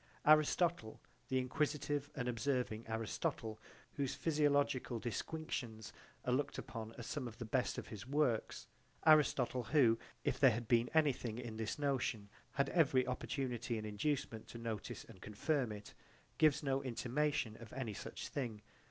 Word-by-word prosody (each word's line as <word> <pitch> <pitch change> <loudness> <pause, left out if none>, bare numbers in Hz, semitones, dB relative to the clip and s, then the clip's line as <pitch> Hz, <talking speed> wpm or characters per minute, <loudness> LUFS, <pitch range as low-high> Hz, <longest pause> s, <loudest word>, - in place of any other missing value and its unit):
Aristotle, 155 -4 +4 0.3
the 130 - +1
inquisitive 145 +2 0
and 125 -3 -2
observing 125 -2 -1
Aristotle, 110 0 -2 0.4
whose 140 -2 0
physiological 145 -5 +2
disquisitions 120 -2 -4 0.3
are 125 - +2
looked 140 +2 0
upon 115 -1 -6
as 120 - -6
some 135 -4 -3
of 110 -2 -9
the 120 - -5
best 125 +3 0
of - - -5
his 105 +2 -7
works 130 - +1 0.4
Aristotle, 135 -5 +5
who 115 -5 +4 0.2
if - - 0
there 135 - +8
had 115 -1 -2
been 120 0 +4
anything 130 -7 +2
in 120 -3 -5
this 110 0 -2
notion 130 -7 0 0.2
had 140 -1 +1
every 140 -7 +4
opportunity 125 -2 -2
and 110 - -4
inducement 110 +1 -2
to - - -8
notice 115 -3 -4
and 95 - -14
confirm 120 +4 0
it 105 0 -8 0.5
gives 150 -1 +5
no 135 -1 +1
intimation 130 -1 0
of 115 - -10
any 125 -5 -3
such - - -6
thing. 115 -7 -4
125 Hz, 150 wpm, -37 LUFS, 115-145 Hz, 0.5 s, there